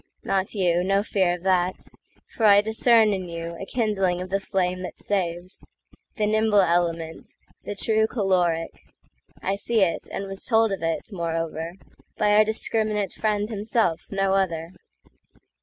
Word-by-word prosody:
Not 195 +2 -1
you—no 185 +1 +2
fear 190 -4 +1
of 175 - -12
that; 185 -1 +2 0.5
for 225 - -2
I 205 0 +7
discernIn 220 -4 +3
you 170 0 -6
a 195 - -6
kindling 195 -7 0
of 185 +1 -6
the 195 - +1
flame 185 -2 -1
that 180 - -7
saves—The 185 +3 -5
nimble 215 -1 +3
element, 170 -2 -1 0.4
the 205 - -4
true 220 +1 +2
caloric;I 185 -1 -3
see 220 +2 0
it, 180 -3 0
and 195 - -4
was 195 0 -6
told 225 -3 +3
of 195 - -3
it, 165 +4 -2
moreover, 165 -2 -3 0.4
By 210 -1 +2
our 210 +1 +6
discriminate 215 -2 -1
friend 210 -1 -1
himself, 210 -5 -1
no 195 -1 0
other. 170 -4 -1
195 Hz, 140 wpm, -24 LUFS, 175-210 Hz, 0.5 s, I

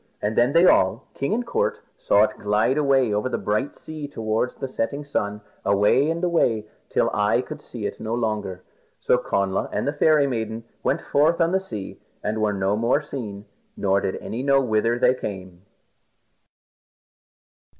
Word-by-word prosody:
And 105 +1 -2
then 120 +4 +3
they 170 +2 +6
all, 110 - +4
king 140 - -2
and 240 +3 0
court, 465 - -1 0.2
saw - - +3
it - - -1
glide 105 +5 +2
away 135 -6 +3
over 105 +5 0
the - - -1
bright 105 +7 -1
sea 155 -2 -7
towards 115 -1 -2
the 135 - -4
setting 140 +3 -3
sun. 105 -7 -2 0.2
Away 105 +9 +3
and 165 +2 -2
away, 120 -11 +2 0.2
till - - +1
eye - - +2
could - - -8
see - - -7
it - - -4
no 110 +1 -2
longer, 105 -6 -2 0.4
and - - +5
Connla 100 -1 -1
and - - -2
the 145 - 0
Fairy 150 -1 +4
Maiden 115 -3 -3 0.2
went - - 0
their 145 - +4
way 165 +3 +4
on 165 0 +3
the 190 - +2
sea, 110 - -8 0.2
and 110 +1 -1
were 105 -1 +2
no 100 0 0
more 120 +7 +1
seen, 105 -8 -6 0.3
nor 100 0 +2
did 95 - -2
any 115 - -5
know 135 0 +4
where 115 -2 +1
they 125 0 +4
came. 95 -5 -7
115 Hz, 180 wpm, -23 LUFS, 105-145 Hz, 0.4 s, they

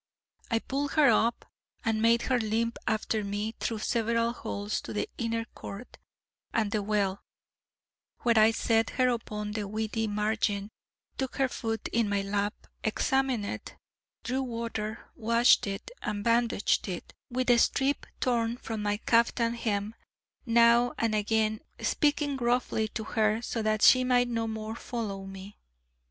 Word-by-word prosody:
I 230 - +2
pulled 275 +5 -2
her 300 -3 +6
up, 230 +1 +1 0.4
and 220 -1 +1
made 230 +1 +4
her 255 -2 +1
limp 230 +1 -1
after 220 0 0
me 205 +2 -3
through 225 - -2
several 230 +1 0
halls 205 -3 -3
to - - -7
the 210 - -1
inner 230 -1 -1
court, 200 +5 -9 0.5
and 215 -3 0
the 215 - 0
well, 200 -2 0 1.0
where 235 -2 +4
I 215 +1 +7
set 225 0 +1
her 255 -1 +4
upon 210 -3 -3
the 210 -1 -3
weedy 220 +1 -2
margin, 210 -1 -1 0.5
took 265 -1 -2
her 270 - +2
foot 225 -3 -3
in 230 -2 +1
my 200 -1 0
lap, 205 +1 -2 0.2
examined 255 0 +1
it, - - -6 0.5
drew 260 +2 -1
water, 230 -3 -4
washed 230 0 +4
it, 195 - -5
and 205 -1 -3
bandaged 230 -3 +2
it 180 -3 -6 0.2
with 250 0 +1
a 240 - +5
strip 275 +4 +1
torn 235 -2 +1
from 225 -3 -5
my 205 0 0
caftan 230 +1 +2
hem, 215 -2 -2 0.5
now 235 +1 +5
and 225 -1 +1
again 215 0 +1 0.2
speaking 290 -1 +1
gruffly 240 -3 +1
to 220 0 -5
her, 215 0 +1
so 230 - -2
that 215 0 +1
she 255 0 +7
might 250 -1 +3
no 230 -1 -1
more 220 0 -4
follow 205 -6 -5
me. 195 +1 -10
225 Hz, 150 wpm, -29 LUFS, 210-235 Hz, 1.0 s, I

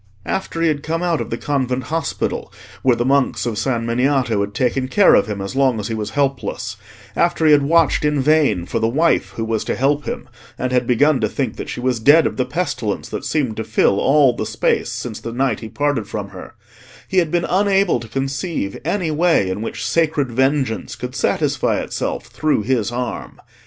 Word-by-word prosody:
After 165 -3 -2
he - - +4
had 150 -2 0
come 165 +3 -2
out 170 -3 +1
of - - -5
the - - -3
convent 130 -3 -1
hospital, 165 +3 -3 0.3
where 125 -2 +3
the 120 +1 -1
monks 135 -1 +1
of 110 -3 -2
San 115 -1 -1
Miniato 125 -2 +1
had 100 0 -4
taken 130 0 0
care 200 +7 +5
of 100 - +4
him 105 -2 -4
as 95 +5 -5
long 130 -4 +2
as 105 - -4
he - - -2
was 110 -1 -3
helpless; 135 -3 -1 0.4
after 170 -1 +1
he 155 - +6
had 145 -1 +6
watched 160 +1 +3
in 150 -1 +1
vain 145 - +2
for 115 - -2
the 110 - +1
Wife 155 +9 +1
who 115 - -2
was 110 -1 -1
to - - -1
help 145 +3 +1
him, - - -5 0.3
and 130 0 -2
had 125 -1 +1
begun 135 +3 +3
to 110 - +1
think 125 -3 -2
that - - -6
she - - -5
was 125 -1 0
dead 145 +8 +6
of - - -2
the 130 - +1
pestilence 125 - -3
that - - -5
seemed 135 -8 -1
to 110 - -2
fill 105 -2 +2
all 135 -3 +4
the - - -3
space - - 0
since - - -5
the 115 - -6
night 125 -2 0
he 110 - -8
parted 145 -6 -1
from - - -5
her, - - -11 0.5
he 190 - +2
had 170 -3 +1
been 175 +1 0
unable 195 0 +2
to 115 - -9
conceive 135 - -3
any 170 +1 -1
way 155 - +2
in 100 +3 -4
which 115 - -4
sacred 155 -5 +1
vengeance 130 -2 0
could 125 +2 -6
satisfy - - 0
itself - - -3
through 155 -8 0
his 120 -1 0
arm. 120 -1 -5
130 Hz, 215 wpm, -19 LUFS, 115-155 Hz, 0.5 s, he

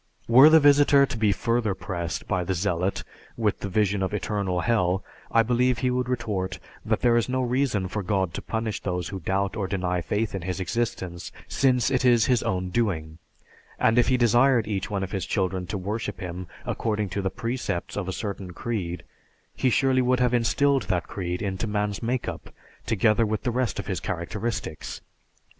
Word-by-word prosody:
Were 130 +6 +8
the 160 0 +7
visitor 145 -1 +6
to 130 - -6
be 110 -2 +2
further 115 -1 0
pressed 90 -2 -4
by 90 -1 0
the 95 +1 -1
zealot 90 0 -1 0.3
with 110 -3 0
the 100 - -4
vision 100 0 +1
of 95 +2 -1
eternal 95 -2 -1
hell, 95 -2 +1 0.3
I 115 - +5
believe 125 +1 +2
he 125 0 0
would 125 0 -1
retort 105 -7 -2 0.3
that - - 0
there 120 -1 +4
is 120 - 0
no 130 0 0
reason 125 -6 0
for 105 +3 -3
God 95 -3 0
to - - -4
punish 110 -1 -3
those 90 -2 -3
who 95 - -5
doubt 95 +4 -1
or 100 -4 -2
deny 90 -2 -1
faith 105 +6 -1
in 95 - -3
His 90 +2 -3
existence, 95 -3 -3 0.2
since 130 -1 +2
it 130 -1 +1
is 120 -3 +5
His 125 -3 +2
own 90 -1 -1
doing; 85 -7 -1 0.6
and 115 +2 +3
if 120 - +3
He 130 - +3
desired 120 0 +4
each 100 -3 -2
one 100 -2 -2
of 95 - -5
His 95 -3 -3
children 95 -2 -1
to 100 - -3
worship 105 +1 -4
Him 90 -1 -6 0.2
according 105 -3 -1
to 100 +2 -2
the 95 - 0
precepts 115 -4 -3
of 105 -3 -3
a - - -1
certain 95 -2 -5
creed, 90 -5 -4 0.5
He 130 - +2
surely 130 +1 +3
would 125 0 +2
have 125 -1 +2
instilled 130 +4 +2
that 90 -2 0
creed 90 -1 -4
into 95 +2 -2
man's 105 -1 -1
make 120 +1 -1
up - - -6 0.4
together 115 +1 +3
with 110 -1 -1
the 125 - 0
rest 125 0 -1
of - - -4
his 95 - -2
characteristics. 105 +4 -4
105 Hz, 195 wpm, -25 LUFS, 95-120 Hz, 0.6 s, Were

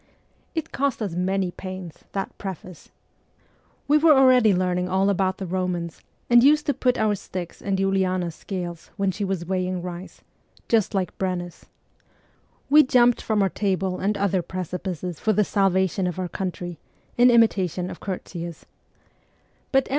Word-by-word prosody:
It 320 - -3
cost 280 -2 -1
us 195 -5 -3
many 185 +1 0
pains, 185 -3 -8
that 195 -1 -3
preface! 185 -2 -8 1.0
We 300 +2 +5
were 310 -1 +6
already 255 -4 +6
learning 180 -1 0
all 190 +2 +2
about 190 -1 0
the 195 - -5
Eomans, 180 -2 -3 0.3
and 240 0 +6
used 300 +2 +5
to 285 - +1
put 250 -1 +1
our 215 -1 +2
sticks 185 -3 -7
in 195 -1 -1
Uliana's 190 -3 0
scales 175 -2 -6
when 195 -1 +1
she 205 +3 -4
was 190 -3 -2
weighing 185 0 -2
rice, 180 +1 -8 0.2
' - - -31
just 220 -3 +2
like 185 -3 -1
Brennus; 180 -2 -4 0.5
' - - -38
we 300 +1 +9
jumped 245 -3 +4
from 215 -2 +1
our 195 - +2
table 190 -2 -1
and 200 +2 0
other 195 -2 +1
precipices 180 -1 -5
for 215 - +1
the 210 - +3
salvation 190 -2 +1
of 180 - -4
our 185 -1 -2
country, 175 -2 -5 0.4
in 245 +1 +6
imitation 190 -7 +2
of - - -9
Curtius; 175 -3 -6 1.1
but 270 -1 +3
M. - - -13
190 Hz, 160 wpm, -24 LUFS, 180-210 Hz, 1.1 s, we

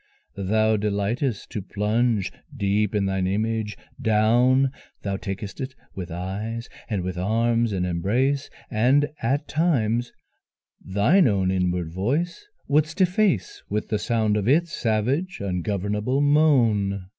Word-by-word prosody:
Thou 110 +3 +2
delight'st 105 +4 -1
to 105 - -3
plunge 105 +1 0 0.3
deep 105 0 +1
in 100 -1 +2
thine 95 -1 0
image 110 +2 -1 0.2
down; 120 +4 +3 0.3
Thou 100 -1 -1
tak'st 100 +2 -6
it 130 0 -5 0.2
with 90 -2 -6
eyes 100 +7 -4 0.2
and 100 -5 -1
with 90 -1 -4
arms 115 +3 +1
in 90 -2 -1
embrace, 120 +11 0 0.2
And 130 +6 +3
at 140 +6 0
times 125 -8 +1 0.7
thine 120 - +3
own 95 -4 +1
inward 90 -3 0
voice 150 - -1 0.2
would'st 155 +5 +1
efface 180 - +1
With 105 +1 -2
the 105 - 0
sound 110 -1 +1
of 105 0 -1
its 165 +5 +3
savage 130 - 0
ungovernable 100 +6 -1
moan. 120 -10 +3
110 Hz, 125 wpm, -24 LUFS, 100-130 Hz, 0.7 s, down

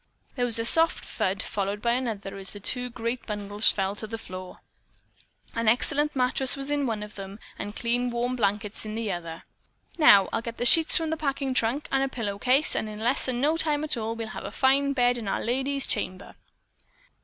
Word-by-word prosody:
There 245 -2 0
was 230 -2 0
a 230 - 0
soft 325 +6 +4
thud, 195 +3 -2
followed 200 0 -3
by 235 +2 0
another 220 -6 -3
as 190 -1 -4
the 205 - -8
two 250 +5 -1
great 235 +1 -4
bundles 205 0 +2
fell 195 0 -2
to 220 - -5
the 225 +1 -5
floor. 185 -3 -10 0.9
An 230 -1 -2
excellent 290 +6 +3
mattress 255 0 0
was 275 +1 -2
in 285 -2 0
one 215 -3 -3
of 210 0 -10
them 195 0 -9 0.2
and 205 +1 -6
clean 245 +1 -1
warm 240 +1 -2
blankets 210 -2 -2
in 215 0 -6
the 225 -2 -2
other. 170 -2 -6 0.6
"Now, 200 -11 +7
I'll 225 - 0
get 230 0 -7
the 245 - -2
sheets 325 +6 +7
from 325 -2 -1
the 320 - -1
packing 275 -3 -2
trunk 255 +4 -1
and 270 - +2
a 270 - +1
pillow 205 -6 -4
case, 260 +6 +4
and 220 - -2
in 210 - -8
less 240 +5 +1
than 250 -2 -1
no 305 +3 +2
time 305 -2 0
at 310 - 0
all 225 -1 -3
we'll 225 -1 -6
have - - -7
a - - -5
fine 280 +1 +2
bed 245 -2 +2
in 220 - -7
our 195 - -1
lady's 270 +3 -1
chamber." 185 +1 -4
235 Hz, 215 wpm, -26 LUFS, 210-265 Hz, 0.9 s, Now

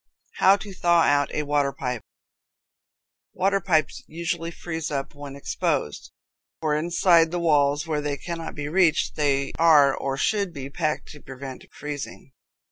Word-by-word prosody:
How 190 +1 +6
to 200 -1 -9
Thaw 170 -2 +3
Out 145 -1 +2
a 150 - -1
Water 145 -1 +1
Pipe. 125 -3 -4 1.3
Water 195 +2 +1
pipes 160 -5 0
usually 165 0 -3
freeze 165 -2 -5
up 140 -2 -3
when 145 -1 -9
exposed, 105 - -2 0.5
for 155 -2 0
inside 170 +1 +3
the 175 - -3
walls, 145 -3 +2
where 155 -2 -1
they 145 -1 -2
cannot 165 0 -6
be 145 -1 -4
reached, 165 0 +2
they 140 -2 +1
are 150 -5 +6
or 135 0 -3
should 200 +1 0
be 140 -2 -7
packed 155 0 -2
to 150 - -12
prevent 135 0 -9
freezing. 145 -2 -7
150 Hz, 150 wpm, -24 LUFS, 140-170 Hz, 1.3 s, How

